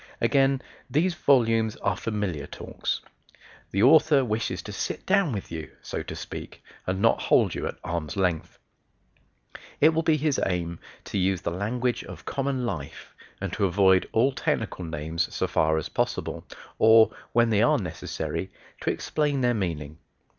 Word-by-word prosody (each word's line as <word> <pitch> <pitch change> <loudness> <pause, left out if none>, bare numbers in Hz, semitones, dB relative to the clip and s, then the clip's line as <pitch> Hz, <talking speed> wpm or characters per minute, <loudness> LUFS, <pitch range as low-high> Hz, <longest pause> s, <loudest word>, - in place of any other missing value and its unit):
Again: 135 -1 +2 0.3
these 170 +5 +2
volumes 115 -8 +3
are 100 -2 -1
"familiar 100 -9 -3
talks." - - -4 0.7
The 100 +3 +1
Author 145 0 +6
wishes 105 -4 -2
to 105 - -7
sit 100 - -4
down 195 -5 +3
with 100 -4 -5
you 80 -1 -5
so - - -4
to - - -7
speak - - -8 0.2
and 95 +1 -1
not 115 - +4
hold - - +3
you - - -3
at - - -6
arm's 85 -1 -3
length. 90 -4 -1 1.2
It 155 - +7
will 160 0 +1
be 160 -1 +3
his 150 -1 0
aim 85 -2 -2 0.3
to 100 - -2
use 95 -1 +1
the 85 - -2
language 115 +7 -1
of - - -10
common 135 -2 -1
life 80 -12 -6 0.3
and - - -4
to - - +1
avoid 95 0 +4
all 125 +5 +3
technical 90 - -2
names 80 +1 -2
so - - +1
far 80 0 +2
as 80 - -2
possible, - - -2 0.3
or, 110 0 +7 0.2
when 120 0 +4
they 105 -1 +3
are 145 +6 +4
necessary, 95 -8 -4 0.3
to - - -1
explain 145 -3 0
their 120 -1 +3
meaning. 80 -7 -3
110 Hz, 160 wpm, -26 LUFS, 90-135 Hz, 1.2 s, It